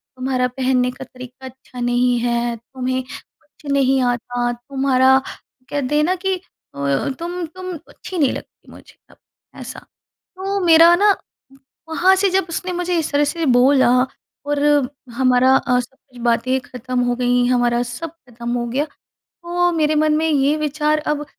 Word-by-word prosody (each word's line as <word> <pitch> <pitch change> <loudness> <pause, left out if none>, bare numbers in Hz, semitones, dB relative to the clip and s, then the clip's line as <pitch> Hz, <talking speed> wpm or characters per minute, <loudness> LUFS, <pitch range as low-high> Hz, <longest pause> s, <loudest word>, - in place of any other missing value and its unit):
"तुम्हारा 255 -1 0
पहनने 255 0 0
का 265 - -9
तरीका 255 +1 -12
अच्छा 260 -1 -11
नहीं 245 0 +2
है। 235 0 0
तुम्हें 255 +2 -3
कुछ 285 +3 -15
नहीं 270 -1 +3
आता। 245 0 -1
तुम्हारा 265 +1 +2 0.5
कहते 285 0 -1
हैं 300 - +3
ना 365 +3 +1
कि 380 +1 -1 0.4
अ, 140 - -1
तुम 350 +1 -4
तुम 370 +3 -8 0.2
अच्छी 370 - -8
नहीं 285 -5 +3
लगती - - -11
मुझे - - -16 0.2
अब" - - -21 0.4
ऐसा। - - -8 0.4
तो 390 +1 -5
मेरा 335 +1 +7
ना 405 +1 +4 0.7
वहाँ 365 +4 +4
से 390 +1 +2
जब 380 -1 +1
उसने 360 +2 -4
मुझे 355 0 -1
इस 315 - -2
तरह 290 +1 +3
से 330 +3 -2
बोला 255 +1 +5 0.6
और 290 0 0 0.5
हमारा 255 0 +4
अ, 250 0 +1
सब 265 +2 -10
कुछ 245 -1 -13
बातें 245 +2 +1
ख़त्म 255 0 -5
हो 245 0 +1
गई 245 0 +2
हमारा 245 -1 +2
सब 250 +7 -6 0.2
ख़त्म 235 0 -6
हो 240 0 -1
गया। 265 +5 -1 0.4
तो 350 0 -1
मेरे 310 -2 +1
मन 305 0 +3
में 320 +1 +1
ये 285 0 +2
विचार 305 0 0
अब 295 0 -1
265 Hz, 165 wpm, -20 LUFS, 245-320 Hz, 0.7 s, मेरा